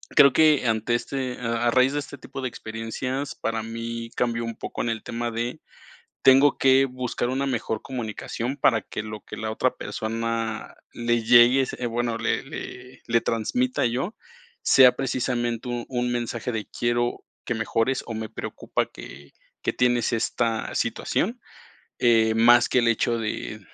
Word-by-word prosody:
creo 140 Hz, -3 st, +7 dB
que 155 Hz, -4 st, +4 dB
ante 110 Hz, +1 st, +1 dB
este 130 Hz, 0 st, -3 dB
a 115 Hz, -1 st, -1 dB
a 120 Hz, -, +4 dB
raíz 130 Hz, +3 st, +4 dB
de 145 Hz, -, 0 dB
este 140 Hz, -, -8 dB
tipo 135 Hz, -, -8 dB
de 130 Hz, -, -1 dB
experiencias, 115 Hz, +6 st, -4 dB
para 115 Hz, 0 st, -2 dB
mí 115 Hz, +1 st, -5 dB
cambió 115 Hz, -1 st, 0 dB
un 115 Hz, -1 st, -4 dB
poco -, -, -5 dB
en 120 Hz, -, -1 dB
el 115 Hz, -1 st, -3 dB
tema 120 Hz, 0 st, -3 dB
de, 120 Hz, +2 st, -3 dB, 0.6 s
tengo 135 Hz, +2 st, +6 dB
que 135 Hz, 0 st, +5 dB
buscar 125 Hz, -1 st, -3 dB
una 135 Hz, +2 st, -1 dB
mejor 115 Hz, -4 st, -2 dB
comunicación 120 Hz, +1 st, -4 dB
para 115 Hz, -4 st, +3 dB
que -, -, -5 dB
lo 110 Hz, 0 st, -7 dB
que -, -, -9 dB
la 110 Hz, 0 st, -3 dB
otra 110 Hz, -, 0 dB
persona 115 Hz, 0 st, -3 dB, 0.2 s
le 120 Hz, -1 st, 0 dB
llegue 120 Hz, +3 st, +6 dB
se 125 Hz, -, -6 dB
bueno, 120 Hz, 0 st, -1 dB
le -, -, -1 dB
le 125 Hz, 0 st, -9 dB
le 115 Hz, 0 st, +3 dB
transmita 245 Hz, -, 0 dB
yo, 130 Hz, -, -2 dB, 0.5 s
sea 130 Hz, -2 st, +7 dB
precisamente 120 Hz, -2 st, -1 dB
un 120 Hz, -1 st, -3 dB
un 125 Hz, -1 st, -1 dB
mensaje 120 Hz, 0 st, -3 dB
de: 110 Hz, -2 st, -3 dB
"Quiero 120 Hz, 0 st, -1 dB, 0.2 s
que 120 Hz, -, -2 dB
mejores, 115 Hz, +3 st, 0 dB
o 115 Hz, -, -5 dB
me 110 Hz, 0 st, -4 dB
preocupa -, -, -3 dB
que 70 Hz, 0 st, -12 dB, 0.3 s
que -, -, 0 dB
tienes 120 Hz, -2 st, +2 dB
esta 115 Hz, 0 st, -1 dB
situación". -, -, -1 dB, 0.6 s
Eh, 110 Hz, -2 st, +4 dB
más 120 Hz, +1 st, +6 dB
que -, -, +3 dB
el 120 Hz, -, +2 dB
hecho 115 Hz, +1 st, +1 dB
de 105 Hz, -1 st, -4 dB
120 Hz, 165 wpm, -25 LUFS, 115-125 Hz, 0.6 s, creo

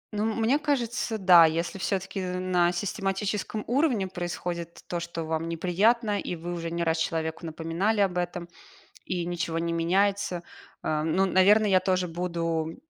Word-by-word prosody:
Ну, 210 Hz, +1 st, 0 dB
мне 235 Hz, +6 st, +2 dB
кажется, 245 Hz, -6 st, -1 dB
да. 180 Hz, -4 st, +7 dB
Если 170 Hz, +4 st, -2 dB
всё-таки 190 Hz, 0 st, -2 dB
на 180 Hz, -1 st, +1 dB
систематическом 195 Hz, +3 st, -2 dB
уровне 245 Hz, -5 st, +1 dB
происходит 175 Hz, -1 st, -5 dB
то, 175 Hz, -, -2 dB
что 170 Hz, -1 st, -5 dB
вам 160 Hz, +1 st, -2 dB
неприятно, 205 Hz, +6 st, +1 dB
и -, -, -4 dB
вы 175 Hz, +1 st, -5 dB
уже 165 Hz, -1 st, -4 dB
не 170 Hz, +1 st, -2 dB
раз 165 Hz, 0 st, +1 dB
человеку 160 Hz, +1 st, -2 dB
напоминали 165 Hz, +7 st, -1 dB
об 180 Hz, -3 st, +1 dB
этом, 175 Hz, 0 st, -4 dB, 0.6 s
и 175 Hz, -2 st, -2 dB
ничего 170 Hz, -1 st, -2 dB
не 170 Hz, 0 st, -1 dB
меняется,- 185 Hz, +2 st, +1 dB, 0.4 s
э, 155 Hz, -1 st, 0 dB
ну, 170 Hz, +5 st, +2 dB
наверно, 195 Hz, +3 st, +5 dB
я 190 Hz, -2 st, +4 dB
тоже 185 Hz, -1 st, 0 dB
буду 165 Hz, -2 st, -2 dB
180 Hz, 155 wpm, -27 LUFS, 170-200 Hz, 0.6 s, да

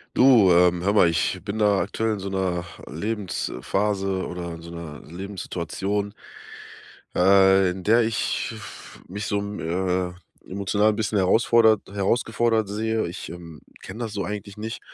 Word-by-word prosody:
Du, 120 Hz, -8 st, +6 dB
ähm, 90 Hz, 0 st, +4 dB
hör 100 Hz, +3 st, +1 dB
mal, 95 Hz, -5 st, +5 dB
ich 85 Hz, -, -1 dB
bin 105 Hz, +2 st, -4 dB
da 105 Hz, -2 st, +3 dB
aktuell 110 Hz, +4 st, -1 dB
in 105 Hz, -, -4 dB
so 95 Hz, +1 st, -5 dB
'ner 95 Hz, -2 st, -1 dB, 0.3 s
Lebensphase 95 Hz, -, -2 dB
oder 85 Hz, -1 st, -5 dB
in 80 Hz, -, -9 dB
so 85 Hz, 0 st, -10 dB
'ner 85 Hz, -3 st, -8 dB
Lebenssituation, 95 Hz, +2 st, -4 dB, 1.0 s
äh, 95 Hz, 0 st, +5 dB
in 90 Hz, 0 st, -7 dB
der 115 Hz, +3 st, +5 dB
ich 115 Hz, 0 st, -1 dB
f -, -, -11 dB
mich 105 Hz, +3 st, -5 dB
so, 100 Hz, -, 0 dB
m 100 Hz, 0 st, -5 dB
äh, 90 Hz, +1 st, -1 dB, 0.4 s
emotional 100 Hz, +2 st, +1 dB
'n 105 Hz, -, -2 dB
bisschen 110 Hz, -1 st, -1 dB
herausfordert 110 Hz, +2 st, +4 dB
herausgefordert 110 Hz, +2 st, +1 dB
sehe. 110 Hz, +2 st, -1 dB
Ich, 85 Hz, -, -7 dB
ähm, 85 Hz, -2 st, -10 dB, 0.2 s
kenn 100 Hz, +5 st, -9 dB
das 115 Hz, -3 st, -4 dB
so 100 Hz, -, -2 dB
eigentlich 100 Hz, -1 st, -6 dB
nicht. 110 Hz, +2 st, -6 dB
100 Hz, 155 wpm, -24 LUFS, 90-105 Hz, 1.0 s, Du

